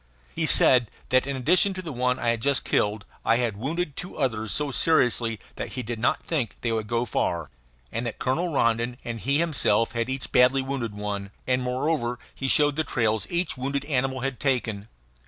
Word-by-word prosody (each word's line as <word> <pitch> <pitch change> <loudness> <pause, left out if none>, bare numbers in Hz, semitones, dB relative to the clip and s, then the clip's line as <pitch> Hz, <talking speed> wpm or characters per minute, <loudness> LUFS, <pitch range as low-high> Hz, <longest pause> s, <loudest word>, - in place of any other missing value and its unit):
He - - -1
said 125 -4 +6 0.2
that 130 +1 +3
in 140 - -2
addition 185 +9 +4
to 185 - -4
the 165 - -5
one 125 +1 0
I 120 - 0
had 115 -1 -2
just 140 +2 +1
killed 105 0 0 0.2
I 115 - +3
had 120 -4 -1
wounded 145 - -3
two 180 - -7
others 110 -7 -1
so 145 -1 0
seriously 120 -7 +2 0.2
that - - -5
he 125 - -4
did 115 0 -5
not 120 - +1
think 145 -9 -2
they 115 - -1
would 110 -2 -2
go 120 +2 0
far, 85 - -2 0.4
and 115 - -3
that - - -5
Colonel 165 +7 -1
Rondon 120 -2 +1
and 115 -1 -4
he 140 +5 +1
himself 135 -9 +2
had 115 0 -2
each 130 0 -3
badly 130 +2 +4
wounded 130 -6 -3
one; 100 -1 -4 0.2
and, 130 0 +1
moreover, 125 -1 -1 0.2
he 135 - -3
showed 145 +1 +3
the 155 - +2
trails 110 -7 0
each 175 -4 -1
wounded 140 +2 -2
animal 130 -2 -1
had 135 -1 -3
taken. 115 -7 -1
125 Hz, 200 wpm, -25 LUFS, 115-140 Hz, 0.4 s, said